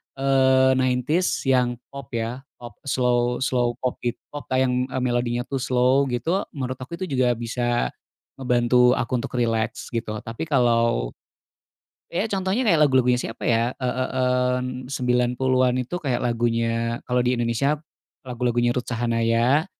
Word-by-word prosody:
eee, 130 -1 +3
90s 130 +7 +1
yang 125 -2 +2 0.2
pop, 140 0 -8
ya, 115 +2 -3 0.2
pop 120 -3 -12
slow 125 -1 +1
slow 120 -2 0
pop, 125 - -2
git 120 -1 -2 0.2
pop 145 0 -8
yang, 130 -1 +1
eee, 130 -1 -3
melodinya, 120 -1 0
tuh, 135 +2 -4
slow, 130 +2 +2
gitu, 130 +10 0 0.2
menurut 130 -2 -4
aku 130 +6 -7
itu 185 - -6
juga 130 -7 +1
bisa 120 - -1 0.5
ngebantu 125 0 +3
aku 115 - -3
untuk 120 - -6
rileks, 115 0 -1
gitu, 115 -3 -3
tapi 115 +8 -5
kalau, 115 - +2 1.0
ya, 195 +6 0
contohnya 195 +3 0
kayak 205 -10 +3
lagu-lagunya 130 -3 +3
siapa, 115 -1 -6
ya, 115 +2 +2
eee 125 0 -2
eee, 125 -1 +1
mmm, 125 0 -5
90-an 125 0 +1
itu 130 +8 -4
kayak 135 -8 -2
lagunya, 115 -1 0
kalau 125 0 +2
di 125 - +2
Indonesia 120 +4 +1 0.5
lagu-lagunya 120 -1 0
Ruth 125 - -2
Sahanaya, 115 +4 +1
125 Hz, 145 wpm, -23 LUFS, 120-130 Hz, 1.0 s, eee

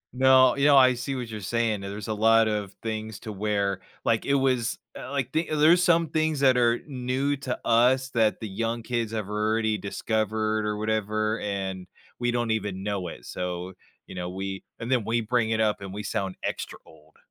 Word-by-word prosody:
No, 130 0 +6
you 140 0 +1
know, 145 -1 +7
I 130 -1 +7
see 130 +3 -4
what 125 -2 -4
you're 110 -1 -6
saying, 110 0 0
yeah, 100 - -6
there's 100 0 -6
a - - 0
lot 115 +1 +4
of 105 -2 -2
things 110 -2 -4
to 110 - -6
where, 100 -1 -1 0.2
like, 115 -1 +1
it 140 - +2
was, 130 -4 +1 0.2
eh - - -7
like, 135 -2 -2
the 160 +1 -1
there's 165 +4 +5
some 170 -2 +3
things 155 -2 0
that 130 -2 +5
are 120 -1 +3
new 135 +1 -1
to 135 -2 -3
us 125 +3 +3
that 110 -3 +2
the 110 - -5
young 115 +3 -3
kids 115 -2 -2
have 110 -3 -3
already 110 +1 0
discovered 110 +1 -1
or 105 0 -2
whatever, 110 0 -1
and 95 -2 -4 0.3
we 120 - 0
don't 120 -1 0
even 100 -3 -2
know 100 -3 -2
it, - - -9
so, 90 0 -4 0.3
you - - -11
know, 90 -1 -4
we 95 +1 -5 0.2
and 115 +2 -5
then 125 -4 +2
we 115 +2 0
bring 115 0 0
it 110 0 0
up 105 -2 +1
and 95 -1 -7
we 105 +2 -6
sound 95 -2 -3
extra - - -4
old. 80 0 -20
110 Hz, 210 wpm, -26 LUFS, 105-125 Hz, 0.3 s, know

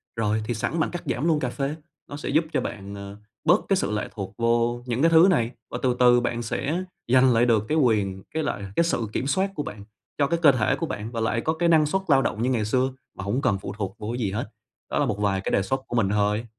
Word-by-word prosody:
rồi 110 -1 0
thì 120 - -1
sẵn 120 +9 -2
bạn 155 - 0
cắt 175 - -5
giảm 125 +6 -1
luôn 160 -3 +3
cà 125 -4 -1
phê. 140 +3 -3 0.3
Nó 145 - -6
sẽ 145 - -5
giúp 155 +4 +3
cho - - +1
bạn, 100 +1 -6
ờ, 100 0 -8 0.3
bớt 180 +6 +4
cái 195 - +4
sự 185 - -1
lệ 105 0 -2
thuộc 100 -4 -6
vô 120 +1 +1
những 125 +1 -2
cái 165 - +5
thứ 165 +3 +7
này 120 -10 +2 0.2
và - - -3
từ 125 -2 +1
từ 120 -1 +6
bạn 120 -1 -2
sẽ 145 +9 -2 0.2
giành 130 +1 +5
lại 115 +1 +4
được 110 -3 +2
cái 155 - +1
quyền 105 -8 +1
cái 160 - -1
lại 100 - -3
cái - - +4
sự 120 -9 -1
kiểm 135 - -1
soát 190 +7 +1
của 145 - -2
bạn, 105 -5 -8 0.3
cho 140 - +2
cái 170 +2 0
cơ 150 -4 +8
thể 115 -6 +1
của 165 - -3
bạn 110 -4 -5
và 115 - -4
lại 115 +1 0
có 160 - 0
cái 170 +1 +1
năng 155 -2 +5
suất 190 +6 0
lao 135 -3 +5
động 110 - -2
như 125 - +1
ngày 115 -4 0
xưa, 130 +4 +1 0.3
mà 95 - -5
hổng 110 +7 -1
cần 100 -7 +1
phụ - - -6
thuộc 100 -2 -4
vô 105 - -5
cái 120 - -4
gì 105 -5 -1
hết. 110 +1 -3 0.4
Đó - - -1
là - - +3
một - - -2
vài 100 -2 +1
cái - - -3
đề 100 - +3
xuất 130 +7 -2
của - - -4
mình 105 -5 +2
thôi, 105 +2 +1
120 Hz, 285 wpm, -25 LUFS, 105-145 Hz, 0.4 s, cơ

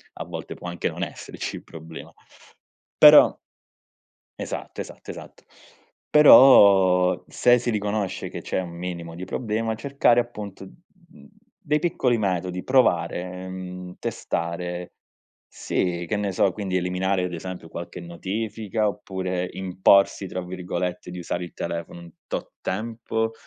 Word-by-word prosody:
a - - -5
volte - - -7
può - - -9
anche 85 -2 -2
non - - -5
esserci - - -6
il - - -12
problema, 80 0 -11 0.9
però - - +8 1.0
Esatto, - - -5
esatto, - - -9
esatto, - - -12 0.7
però 95 -11 +7
se 125 0 +4
si 120 - -3
riconosce 105 -2 -2
che - - -7
c'è - - -2
un 85 - -7
minimo 85 -1 -6
di 90 +2 -6
problema, 110 +2 -2
cercare, 135 -1 +2
appunto, 105 -5 -6
mhmm, 175 - -19 0.3
dei 150 -2 0
piccoli 130 -8 +1
metodi, 90 -3 -2
provare, 90 -6 +1
mhmm, 90 -1 -7
testare. 90 +1 -4 0.6
Sì, 85 -1 -2
che 105 - -1
ne 100 -1 -1
so, 95 +1 +2
quindi 95 -3 -2
eliminare, 90 +1 0
ad 90 - -5
esempio, 90 0 -7
qualche 85 +2 -7
notifica, 105 +5 -3
oppure 95 -3 -3
"imporsi", 95 +1 +3
tra 90 - -4
virgolette, 90 0 -4
di 90 - -7
usare 85 0 -3
il 85 - -9
telefono 85 0 -5
un 85 -1 -12 0.2
tot - - -5
tempo. 115 +2 -2
95 Hz, 135 wpm, -24 LUFS, 90-110 Hz, 1.0 s, però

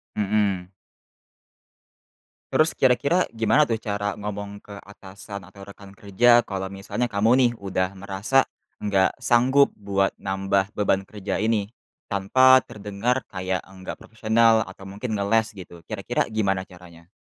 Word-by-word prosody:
Mhm. 100 -3 0 1.8
Terus 155 +1 +2
kira-kira 140 +7 +3
gimana 115 +6 +3
tuh 115 -6 -1
cara 105 -2 -2
ngomong 100 0 -6
ke 100 - -12
atasan 100 -1 -11
atau 100 0 -13
rekan 100 0 -13
kerja 120 +5 +4
kalau 95 -1 -4
misalnya 100 +5 -3
kamu 110 0 +1
nih, 125 -2 +4
udah 95 -2 -2
merasa, 100 +7 +1 0.4
nggak 100 -2 +2
sanggup 130 +4 +4
buat 100 -1 0
nambah 95 +1 -1
beban 95 -2 0
kerja 105 -2 -4
ini? 110 -1 0 0.4
Tanpa 130 +7 +5
terdengar 105 +5 -2
kayak 95 -1 -3
nggak 95 -1 -9
profesional 110 0 +2
atau - - -12
mungkin 105 +4 -5
ngeles 110 +2 +1
gitu, 90 -2 -11
kira-kira - - -2
gimana 95 -3 -1
caranya? 85 -2 -16
100 Hz, 130 wpm, -24 LUFS, 95-115 Hz, 1.8 s, Tanpa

